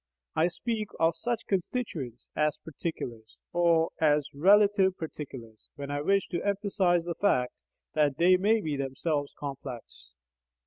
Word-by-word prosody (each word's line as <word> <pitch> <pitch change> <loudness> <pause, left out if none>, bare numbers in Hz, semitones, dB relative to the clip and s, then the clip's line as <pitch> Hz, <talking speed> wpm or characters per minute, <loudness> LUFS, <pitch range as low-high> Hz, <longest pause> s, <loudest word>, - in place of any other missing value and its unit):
I 160 +2 +4
speak 215 +4 -3
of 165 0 +3
such 230 +7 -2
constituents 170 - -3
as 150 -1 +1
"particulars," 120 -8 -6 0.2
or 170 -1 +3
as 150 -2 +3
"RELATIVE 195 +4 +4
particulars" 130 -8 -8
when 140 -1 -6
I 145 0 -1
wish 195 +5 +2
to 175 - -2
emphasize 195 -4 +1
the 175 - -2
fact 145 -9 +1 0.4
that 150 -3 +2
they 180 +2 +6
may 210 +4 +3
be 155 -5 -2
themselves 140 +2 -2
complex. 130 - -8
165 Hz, 135 wpm, -29 LUFS, 140-195 Hz, 0.4 s, they